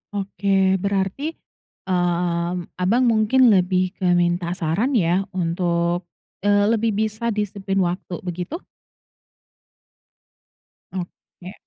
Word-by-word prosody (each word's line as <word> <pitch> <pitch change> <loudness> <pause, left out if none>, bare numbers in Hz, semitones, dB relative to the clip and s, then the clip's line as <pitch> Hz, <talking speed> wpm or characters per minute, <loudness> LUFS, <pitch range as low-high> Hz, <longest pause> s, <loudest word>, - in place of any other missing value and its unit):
Oke, 200 0 -4 0.4
berarti, 195 +4 -1 0.6
mmm, 175 -1 0 0.2
Abang 230 +8 +3
mungkin 220 +4 +3
lebih 185 0 +2
ke 190 - -4 0.2
minta 175 0 0 0.2
saran 175 - +1
ya, 175 +3 +2 0.2
untuk, 170 0 0 0.3
eee, 205 0 +3
lebih 225 0 +1
bisa 220 +2 -1
disiplin 195 -1 -2
waktu, 180 +1 -4
begitu? 180 - -4 2.4
Oke. 180 0 -8
185 Hz, 95 wpm, -22 LUFS, 175-205 Hz, 2.4 s, Abang